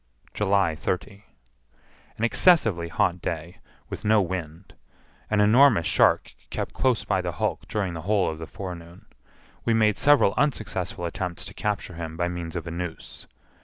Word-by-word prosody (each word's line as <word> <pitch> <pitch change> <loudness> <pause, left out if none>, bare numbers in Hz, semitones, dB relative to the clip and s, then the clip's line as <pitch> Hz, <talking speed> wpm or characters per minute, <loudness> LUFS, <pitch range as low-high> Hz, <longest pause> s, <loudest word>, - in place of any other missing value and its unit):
July 100 -4 +2
30. 100 +4 -4 0.9
An 110 - -4
excessively 115 - +3
hot 85 +1 0
day, 85 +2 -5 0.3
with - - -7
no 110 0 +4
wind. 90 -2 -4 0.6
An 105 - +1
enormous 110 -3 +5
shark - - +3 0.2
kept - - -4
close 130 -3 +1
by 95 - +1
the 90 -1 -3
hulk - - -2
during 100 -5 -2
the 80 - -6
whole 100 +2 +1
of 80 0 -4
the 80 - -7
forenoon. 85 -3 -9 0.6
We 115 - +2
made 110 -2 +2
several 145 -9 +5
unsuccessful 110 - -1
attempts 90 0 -4
to - - -8
capture 105 -3 -3
him 80 -1 -6
by 85 0 0
means 85 -1 -6
of 85 -2 -4
a 85 - -5
noose. 85 -1 -7
90 Hz, 160 wpm, -25 LUFS, 85-105 Hz, 0.9 s, enormous